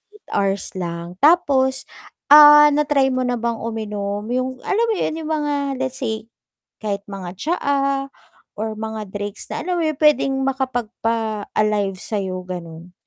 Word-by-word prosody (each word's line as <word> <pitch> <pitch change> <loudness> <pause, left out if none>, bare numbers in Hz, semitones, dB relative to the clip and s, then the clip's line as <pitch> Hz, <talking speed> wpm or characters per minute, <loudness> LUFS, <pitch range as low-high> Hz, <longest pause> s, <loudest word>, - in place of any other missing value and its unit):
8 420 - -20
hours 195 0 -1
lang 170 +1 -6
tapos 275 -5 +3 0.5
ah, 295 0 +10
na-try 285 -2 +2
mo 255 0 0
na 245 - 0
bang 235 0 -2
uminom 210 -2 -4
yung 255 +1 -2
alam 440 +4 +1
mo 445 - +1
yun 325 -4 -2
yung 315 - -6
mga 295 -2 0 0.3
let's 260 0 -4
say 220 -3 -3 0.5
kahit 200 -2 -3
mga 185 -2 -7
tsaa 275 -2 0 0.5
or 220 +1 -3
mga 220 0 -5
drinks 205 0 -6
na - - -3
alam 355 +1 -1
mo 330 - 0
yun 310 -1 0
pwedeng 300 -3 +4 0.2
makapagpa 230 -5 -2
-alive 205 -3 0
sayo 190 -4 -3
ganun. 170 -1 -8
235 Hz, 150 wpm, -21 LUFS, 205-285 Hz, 0.5 s, ah